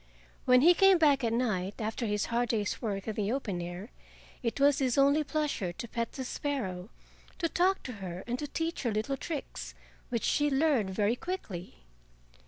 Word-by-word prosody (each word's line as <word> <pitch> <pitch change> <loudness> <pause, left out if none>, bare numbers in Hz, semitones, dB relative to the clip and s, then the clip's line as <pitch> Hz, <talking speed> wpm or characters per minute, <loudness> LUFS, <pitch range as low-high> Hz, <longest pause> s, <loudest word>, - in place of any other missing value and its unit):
When 250 0 +6
he 345 +5 +8
came 390 +1 +6
back 290 -5 +4
at 230 - +1
night 210 -5 -1
after 220 +2 -2
his 210 -1 0
hard 240 0 +1
day's 210 -4 -1
work 200 -3 -3
in 220 - -1
the 210 0 -1
open 210 -9 -2
air 175 +6 -7 0.5
it 235 +2 -2
was 285 +1 +4
his 260 -2 +1
only 280 +2 +5
pleasure 295 - -1
to 235 - -7
pet 230 +1 -3
the 265 - -4
sparrow, 220 -11 -3 0.5
to 340 - 0
talk 370 +3 +1
to 255 - -5
her 180 -1 -5
and 245 +1 -3
to 295 - -3
teach 325 +3 -3
her 240 - 0
little 215 +6 -1
tricks, 290 +1 -6 0.3
which 235 -3 -1
she 295 -1 +2
learned 270 -7 +2
very 205 +4 +1
quickly. 190 - -6
245 Hz, 190 wpm, -30 LUFS, 205-290 Hz, 0.5 s, he